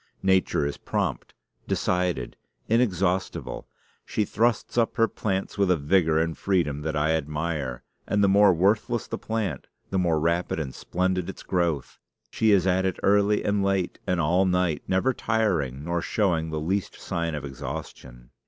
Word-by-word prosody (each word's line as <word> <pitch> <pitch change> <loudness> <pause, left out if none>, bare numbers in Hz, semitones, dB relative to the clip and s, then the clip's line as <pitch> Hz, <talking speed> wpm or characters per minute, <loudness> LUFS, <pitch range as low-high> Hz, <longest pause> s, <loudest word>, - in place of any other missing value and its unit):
Nature 95 -6 +2
is 70 - -3
prompt, - - -3 0.3
decided, 90 -8 -1 0.3
inexhaustible. 95 -5 0 0.4
She 105 - -1
thrusts 115 +3 0
up 115 -2 +1
her 115 -1 +4
plants 95 -1 -3
with 100 -2 +3
a 90 - +4
vigor 80 +1 +2
and 80 0 0
freedom 85 -7 0
that 80 +1 -3
I 75 +1 +2
admire; 75 -4 -2 0.2
and 105 0 +2
the - - +5
more 100 +1 +6
worthless 105 +6 +1
the - - -5
plant, 105 -11 -3 0.2
the 95 - +1
more 85 -3 +2
rapid 85 +1 0
and 65 -5 -4
splendid 90 0 -1
its - - -8
growth. 85 -6 -1 0.3
She 110 - +2
is 100 -4 +4
at 95 0 +2
it 95 -2 -1
early 100 +1 +3
and 100 -1 +1
late, 95 -2 0
and 90 -1 +1
all 85 +4 +3
night; 90 -5 +1
never 95 +8 +2
tiring, 90 - 0
nor 85 0 -1
showing 85 -5 0
the 80 -1 -3
least 95 +5 -2
sign 85 -2 -2
of 75 -1 -5
exhaustion. - - -8
90 Hz, 160 wpm, -26 LUFS, 80-100 Hz, 0.4 s, more